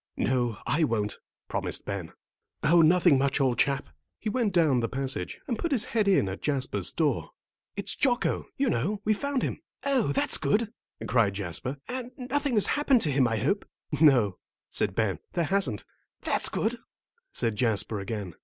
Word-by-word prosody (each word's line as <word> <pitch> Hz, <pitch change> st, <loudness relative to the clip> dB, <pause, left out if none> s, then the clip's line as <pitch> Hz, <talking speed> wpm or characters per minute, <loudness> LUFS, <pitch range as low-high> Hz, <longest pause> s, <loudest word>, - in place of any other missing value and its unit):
"No, 120 Hz, -3 st, 0 dB
I 150 Hz, +6 st, +1 dB
won't," 105 Hz, -7 st, -1 dB, 0.3 s
promised -, -, -4 dB
Ben. 95 Hz, -5 st, -4 dB, 0.5 s
"Oh, 170 Hz, +1 st, +5 dB
nothing 170 Hz, -3 st, +5 dB
much, 140 Hz, +1 st, +1 dB
old 130 Hz, -3 st, +1 dB
chap." 140 Hz, 0 st, +1 dB, 0.3 s
He 220 Hz, -, -3 dB
went 225 Hz, -2 st, 0 dB
down 160 Hz, -8 st, +3 dB
the 115 Hz, -, -1 dB
passage, 130 Hz, -9 st, -3 dB
and 235 Hz, -4 st, -2 dB
put 340 Hz, -, -2 dB
his 245 Hz, -6 st, +1 dB
head 215 Hz, -3 st, 0 dB
in 190 Hz, -, +4 dB
at 95 Hz, +1 st, -5 dB
Jasper's 140 Hz, -3 st, -1 dB
door, -, -, 0 dB, 0.5 s
"It's -, -, 0 dB
Jocko, 245 Hz, -3 st, +1 dB
you 275 Hz, -1 st, +1 dB
know; 195 Hz, -, 0 dB
we've 215 Hz, -1 st, +1 dB
found 280 Hz, -2 st, -1 dB
him." -, -, -3 dB, 0.2 s
"Oh, 270 Hz, -6 st, +2 dB
that's -, -, +2 dB
good," 210 Hz, +10 st, +1 dB, 0.3 s
cried 110 Hz, -6 st, +2 dB
Jasper; 100 Hz, -, -3 dB
"and 250 Hz, -1 st, -4 dB
nothing 270 Hz, +1 st, -1 dB
has 210 Hz, -, +6 dB
happened 275 Hz, -4 st, +3 dB
to 155 Hz, -, +1 dB
him, 135 Hz, -2 st, +3 dB
I 115 Hz, -1 st, -1 dB
hope?" 200 Hz, -, 0 dB, 0.4 s
"No," 120 Hz, -, +5 dB, 0.3 s
said -, -, -1 dB
Ben, -, -, 0 dB
"there 170 Hz, -, +1 dB
hasn't." 145 Hz, -, 0 dB, 0.4 s
"That's -, -, +2 dB
good," 230 Hz, +2 st, -1 dB, 0.5 s
said 115 Hz, -2 st, 0 dB
Jasper 110 Hz, -2 st, +1 dB
again. 100 Hz, -3 st, -5 dB
145 Hz, 175 wpm, -27 LUFS, -, 0.5 s, has